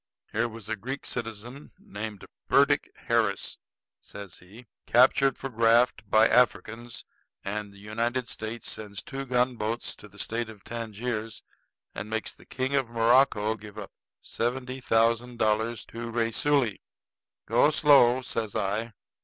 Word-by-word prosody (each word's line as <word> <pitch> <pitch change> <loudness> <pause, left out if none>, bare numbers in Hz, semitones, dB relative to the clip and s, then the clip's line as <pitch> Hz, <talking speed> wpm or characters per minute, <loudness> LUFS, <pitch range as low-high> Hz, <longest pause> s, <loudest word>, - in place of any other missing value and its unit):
Here 115 +2 +1
was 115 -2 -10
a 110 - -1
Greek 130 +7 -6
citizen 120 +3 -6
named 110 - -7 0.2
Burdick - - +4
Harris," - - 0 0.4
says 100 -3 -9
he, 105 +7 -15 0.2
"captured 130 +3 +5
for - - -9
a - - -1
graft 115 -1 +3
by 110 +1 +6
Africans; 120 -1 +1 0.4
and 105 +1 -3
the 100 - -16
United 115 +4 -2
States 110 +1 -6
sends 100 -3 -6
two 135 0 -6
gunboats 125 -2 0
to - - -12
the - - -18
State 115 0 -2
of 105 -3 -13
Tangiers 115 -1 -4 0.5
and 105 - -6
makes 110 0 -3
the - - -19
King 130 +1 -2
of 135 -4 +1
Morocco 115 -2 +3
give 105 -1 -12
up 105 -2 -7 0.3
seventy 130 +2 -3
thousand 115 0 +2
dollars 110 +1 0
to 115 0 -7
Raisuli." 115 +1 +1 0.6
"Go 120 +6 +4
slow," 140 -5 +5
says 110 -4 -3
I. 105 +3 -1
115 Hz, 140 wpm, -27 LUFS, 110-125 Hz, 0.6 s, by